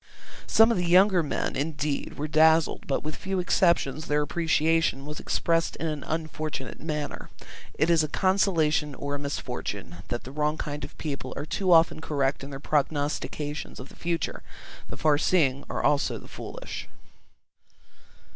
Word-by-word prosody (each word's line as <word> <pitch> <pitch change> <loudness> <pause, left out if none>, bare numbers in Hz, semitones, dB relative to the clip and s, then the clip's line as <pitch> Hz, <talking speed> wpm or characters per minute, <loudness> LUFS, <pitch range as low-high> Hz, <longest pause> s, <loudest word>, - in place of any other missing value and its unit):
Some 225 +1 +6
of 215 - +1
the 175 - 0
younger 185 +1 +6
men 150 - -2
indeed 145 0 -2
were 150 - -2
dazzled, 160 +1 +4
but 140 - 0
with 155 0 -4
few 190 0 -3
exceptions 170 -4 +2
their 150 0 +2
appreciation 160 -2 +1
was 150 0 -6
expressed 165 0 0
in - - -4
an 150 -3 -3
unfortunate 155 -4 -4
manner. 150 -2 -4 0.5
It 160 +3 +2
is 165 -2 +4
a - - 0
consolation 160 -5 +2
or 140 +1 -4
a 145 - -2
misfortune 125 - -5
that 120 - -3
the 130 - -9
wrong 150 +2 0
kind 150 -1 -4
of - - -8
people 140 -4 -4
are - - -3
too 185 +4 0
often 165 -1 +5
correct 140 -4 0
in 140 - -7
their 135 -1 -6
prognostications 150 0 -2
of 130 - -9
the - - -15
future; 170 -1 -2 0.5
the - - -6
far 145 +1 +3
seeing 140 -6 +2
are - - -2
also 145 -1 +2
the - - -12
foolish. - - -7
150 Hz, 165 wpm, -27 LUFS, 145-165 Hz, 0.5 s, Some